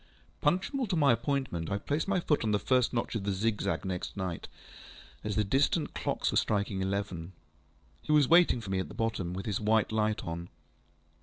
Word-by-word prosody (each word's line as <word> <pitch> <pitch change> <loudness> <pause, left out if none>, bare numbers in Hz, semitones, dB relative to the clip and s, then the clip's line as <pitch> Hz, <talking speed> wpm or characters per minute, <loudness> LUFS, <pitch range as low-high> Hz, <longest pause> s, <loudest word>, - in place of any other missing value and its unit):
Punctual 195 - +1
to 185 - 0
my 145 -6 +5
appointment, 115 - -2
I 100 - 0
placed 145 - -2
my 195 -2 +2
foot 150 -6 +1
on 110 - 0
the 105 - +3
first 125 +2 +2
notch 115 -2 -2
of 110 -4 -2
the 100 - 0
zigzag 100 0 -1
next 95 +1 -4
night, 90 -3 -4 0.8
as 105 -1 -2
the 105 - +3
distant 140 - +1
clocks - - -1
were - - +1
striking 100 -2 0
eleven. 95 -3 -3 0.7
He - - -4
was 150 -3 +5
waiting 170 -7 +5
for 100 -3 -6
me 95 - +1
at 95 - -2
the 105 - -11
bottom, 110 -6 -2
with 95 - -5
his 105 -3 -1
white 110 0 +2
light 110 -1 0
on. 85 +1 -5
105 Hz, 200 wpm, -30 LUFS, 95-140 Hz, 0.8 s, my